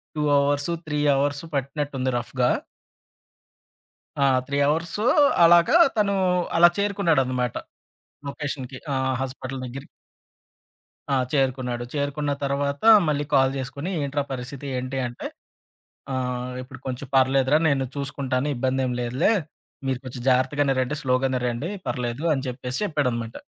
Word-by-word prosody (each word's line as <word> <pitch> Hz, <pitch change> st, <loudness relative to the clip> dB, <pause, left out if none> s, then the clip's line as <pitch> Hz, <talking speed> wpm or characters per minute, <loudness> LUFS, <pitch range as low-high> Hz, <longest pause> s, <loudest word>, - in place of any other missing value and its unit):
2 150 Hz, -, -1 dB
hours, 145 Hz, +3 st, +1 dB, 0.2 s
3 150 Hz, -1 st, -1 dB, 0.2 s
hours 145 Hz, +2 st, 0 dB
పట్టినట్టుంది, 140 Hz, -1 st, -2 dB
రఫ్‌గా. 125 Hz, +1 st, 0 dB, 1.7 s
ఆ! -, -, +3 dB, 0.2 s
3 140 Hz, -, -2 dB
hours 165 Hz, +4 st, -1 dB, 0.5 s
అలాగా 170 Hz, -, +6 dB, 0.2 s
తను 205 Hz, -2 st, +2 dB, 0.4 s
అలా 175 Hz, +1 st, +8 dB
చేరుకున్నాడనమాట 155 Hz, -, +1 dB, 0.7 s
లొకేషన్‌కి. 140 Hz, -3 st, -5 dB, 0.2 s
ఆహ్, 130 Hz, 0 st, 0 dB
హాస్పిటలు 130 Hz, 0 st, -5 dB
దగ్గరికి. 135 Hz, +2 st, -8 dB, 1.2 s
ఆ! 140 Hz, -, +2 dB, 0.2 s
చేరుకున్నాడు. 130 Hz, -3 st, 0 dB
చేరుకున్న 145 Hz, 0 st, -1 dB
తరవాత 140 Hz, +1 st, -1 dB, 0.2 s
మళ్ళీ 145 Hz, -1 st, 0 dB
కాల్ 135 Hz, -1 st, +4 dB
చేసుకొని 140 Hz, +5 st, -5 dB
ఏంట్రా 140 Hz, +1 st, -1 dB
పరిస్థితి 130 Hz, +2 st, -6 dB
ఏంటి 130 Hz, +1 st, -4 dB
అంటే, 120 Hz, -, -7 dB, 0.9 s
"ఆ! -, -, -1 dB, 0.5 s
ఇప్పుడు 130 Hz, 0 st, -12 dB
కొంచెం 130 Hz, +1 st, -5 dB
పర్లేదురా! 135 Hz, +2 st, +4 dB
నేను 135 Hz, -2 st, +1 dB
చూసుకుంటాను 140 Hz, -1 st, -2 dB
ఇబ్బందేం 130 Hz, 0 st, 0 dB
లేదులే. 125 Hz, -, +1 dB, 0.6 s
మీరు 130 Hz, -2 st, 0 dB
కొంచెం 125 Hz, -1 st, -7 dB
జాగ్రత్తగానేరండి 130 Hz, +1 st, +1 dB
స్లోగానే 130 Hz, -1 st, +1 dB
రండి" 120 Hz, +9 st, -3 dB, 0.2 s
పర్లేదు 125 Hz, +4 st, -3 dB
అని 135 Hz, -1 st, -3 dB
చెప్పేసి 125 Hz, 0 st, -4 dB
చెప్పాడనమాట. 125 Hz, -, -2 dB
135 Hz, 115 wpm, -24 LUFS, 130-145 Hz, 1.7 s, అలా